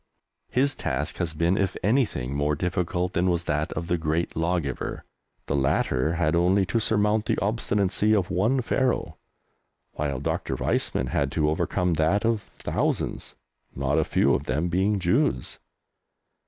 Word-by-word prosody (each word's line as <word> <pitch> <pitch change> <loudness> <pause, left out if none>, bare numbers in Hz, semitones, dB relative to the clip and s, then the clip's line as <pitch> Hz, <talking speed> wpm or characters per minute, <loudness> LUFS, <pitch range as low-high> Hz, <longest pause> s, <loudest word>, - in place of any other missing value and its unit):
His 135 +2 +2
task 70 +5 -3
has 85 -3 -2
been, 85 +4 +2
if 95 -1 0
anything, 100 - +1
more 75 +1 0
difficult 90 +2 -1
than 90 0 +2
was 85 -1 0
that 75 -1 -1
of 85 - -4
the 85 0 0
great 80 +2 -1
Lawgiver. 80 -5 -2 0.4
The 70 - -1
latter 70 +1 +1
had 85 -1 +1
only 95 +3 +3
to 115 - +3
surmount 105 0 +2
the - - 0
obstinacy 105 0 +1
of 95 -4 0
one 115 +9 +2
Pharaoh, 120 - 0 0.7
while 70 -3 -2
Dr. 70 - -2
Weizmann 65 - 0
had 70 +1 0
to 75 -1 +2
overcome 90 +3 0
that 80 +8 +1
of 115 -2 +1
thousands - - -3 0.4
not 70 +3 +1
a - - +3
few - - +2
of - - -1
them 75 +7 -1
being 95 +4 +1
Jews! 65 -8 0
85 Hz, 155 wpm, -25 LUFS, 75-100 Hz, 0.7 s, only